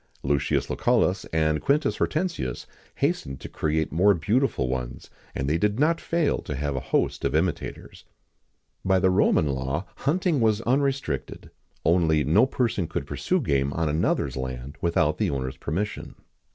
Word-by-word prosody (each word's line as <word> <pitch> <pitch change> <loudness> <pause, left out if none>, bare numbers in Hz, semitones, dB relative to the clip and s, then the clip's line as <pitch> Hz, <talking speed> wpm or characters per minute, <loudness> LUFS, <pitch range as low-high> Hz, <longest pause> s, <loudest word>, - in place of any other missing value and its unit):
Lucius 70 0 +1
Lucullus, 95 +1 +1
and 80 -1 0
Quintus 145 +1 +1
Hortensius 155 - -2 0.3
hastened 65 -1 -1
to - - -8
create 80 0 -1
more 100 +5 +4
beautiful 110 - +1
ones, 60 -1 -5 0.2
and 65 - -2
they 80 +3 +1
did 105 +4 +1
not 165 +3 +2
fail 165 -3 0
to 75 - -5
have 70 +1 -2
a - - 0
host - - -1
of - - 0
imitators.[XIX - - -3 0.7
33] - - -5
By 95 - +5
the 95 0 +3
Roman 90 -4 +3
law, 65 +7 -2
hunting 165 +1 +1
was 110 -2 +3
unrestricted:[XIX 135 - -1 0.3
34] 80 - +5
only, 80 -4 +3
no 80 - +4
person 115 -9 -1
could - - -3
pursue - - -1
game 70 -1 +1
on 80 -2 0
another's 75 +3 0
land 65 +1 -5
without 85 -1 +1
the - - +1
owner's 65 -1 -3
permission. 95 +11 -4
80 Hz, 160 wpm, -25 LUFS, 70-115 Hz, 0.7 s, By